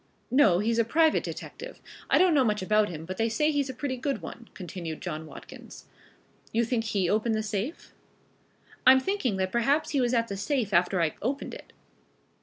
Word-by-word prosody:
"No, 245 -10 +5
he's 225 +4 +1
a - - +5
private 315 +7 +3
detective. - - -8 0.3
I - - +5
don't 365 -2 +5
know 280 -3 +4
much 210 -4 0
about 210 +2 +2
him, 160 -2 -7
but 185 +2 -6
they 225 +1 +1
say 300 +7 +1
he's 285 -2 0
a - - -4
pretty 260 0 -3
good 265 -2 -2
one," 225 +7 -10
continued 170 -3 -6
John 160 -3 -5
Watkins. - - -12 0.7
"You 230 +1 +1
think 230 -1 -1
he 200 -4 0
opened 220 +3 +1
the 215 - -1
safe?" 215 - -4 0.9
"I'm 260 0 +9
thinking 265 - -1
that 185 0 -1
perhaps 275 +6 +1
he 280 -3 +1
was 245 0 +1
at 230 0 +1
the 200 - -5
safe 235 -2 -1
after 175 0 +3
I 160 - 0
opened 270 +6 -3
it. - - -11
230 Hz, 200 wpm, -27 LUFS, 195-270 Hz, 0.9 s, I'm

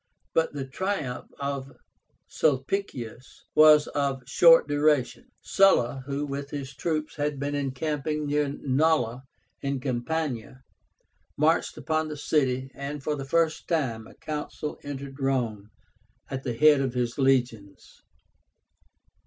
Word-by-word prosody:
But 165 -1 +1
the 140 -2 -4
triumph 150 -3 -3
of 140 -1 -4 0.5
Sulpicius 135 - -2
was 155 -1 +7
of 140 -2 -2
short 165 +3 +6
duration. 145 -5 +1 0.2
Sulla, 135 -10 +3
who 140 +1 -2
with 140 0 -5
his 140 -2 -6
troops 155 0 -2
had 145 -1 -1
been 145 +1 -2
encamping 150 +2 -2
near 145 0 +1
Nola 135 -3 +1 0.4
in 140 -1 -2
Campania, 130 -1 -3 0.7
marched 155 +3 +2
upon 160 -1 -1
the 150 -1 -6
city, 135 -3 0
and 140 +1 -6
for 150 0 -1
the 135 -2 -6
first 165 +2 +1
time 125 -10 -1
a - - -16
Consul 150 0 -5
entered 140 -1 -7
Rome 120 -7 -1 0.6
at 135 -1 -3
the 125 -4 -3
head 150 +2 +5
of 130 -2 -2
his 120 +1 -1
legions. 120 -7 0
140 Hz, 125 wpm, -26 LUFS, 130-150 Hz, 0.7 s, was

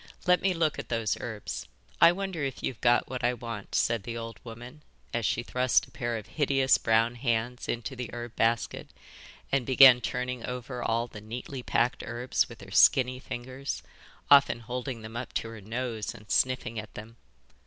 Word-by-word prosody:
Let 180 -1 +4
me 190 -2 +1
look 160 -2 +1
at - - -7
those 115 -3 0
herbs. 110 -3 -5 0.3
I 170 - +9
wonder 190 -4 -3
if 135 -2 -4
you've 125 - -3
got 120 0 +4
what 130 0 -5
I 120 +1 +2
want,' 115 -3 -6
said 115 -2 +2
the 115 +2 -6
old 115 0 -7
woman 120 +5 -10 0.3
as 115 -3 0
she 120 - 0
thrust 125 +1 +2
a - - -22
pair 120 -1 -2
of 110 - -8
hideous 135 -3 +2
brown 115 +1 +3
hands 120 0 -2
into 120 +3 -3
the 125 -1 -5
herb 120 -1 -7
basket, 115 0 0 0.6
and 135 -2 +2
began 130 0 +8
turning 125 0 -3
over 125 0 -5
all 115 0 0
the 105 -3 -11
neatly 125 +4 -6
packed 120 0 +1
herbs 120 +2 -1
with 115 -4 -12
her 95 -1 -12
skinny 125 +4 +5
fingers, 130 +2 -5 0.5
often 140 -4 +6
holding 125 0 -5
them 110 +1 -9
up 120 +1 -5
to 115 - -1
her 115 -2 -9
nose 115 +1 -4
and 105 -2 -12
sniffing 125 -3 +1
at 110 - -10
them. 110 +2 -10
120 Hz, 185 wpm, -28 LUFS, 115-130 Hz, 0.6 s, I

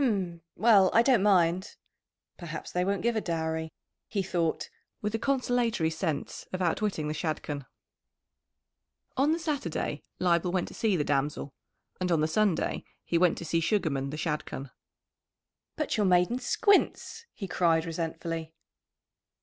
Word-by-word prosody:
"H'm! 185 -9 0
Well, 200 -2 +6
I 230 - +7
don't 245 -5 +4
mind!" 185 -1 +3 0.6
"Perhaps 165 -3 -7
they 180 - +1
won't 200 +1 -1
give 235 0 +2
a 220 - +1
dowry," 160 -2 -2 0.4
he 200 -3 -1
thought, 170 -3 -1 0.3
with 210 0 -3
a 225 - 0
consolatory 245 -10 +1
sense 160 -2 -3
of 185 - -3
outwitting 180 -2 0
the 150 - -1
Shadchan. 150 -3 -3 1.5
On 275 +4 +3
the 325 - +2
Saturday 285 - -2 0.2
Leibel 175 0 +2
went 180 -1 0
to - - -11
see 215 -4 +1
the 155 - +1
damsel, 145 0 -1 0.5
and 180 -1 -1
on 165 - +3
the 155 - +2
Sunday 200 +1 +1 0.2
he 170 - +1
went 180 -1 +3
to 170 - -6
see 165 +1 +1
Sugarman 160 -7 0
the 150 - -5
Shadchan. 150 -4 -3 1.0
"But 305 -7 -1
your 210 - +2
maiden 180 +7 +3
squints!" 405 - +1
he 195 - -5
cried 165 -2 +2
resentfully. 165 0 -4
175 Hz, 150 wpm, -29 LUFS, 160-210 Hz, 1.5 s, I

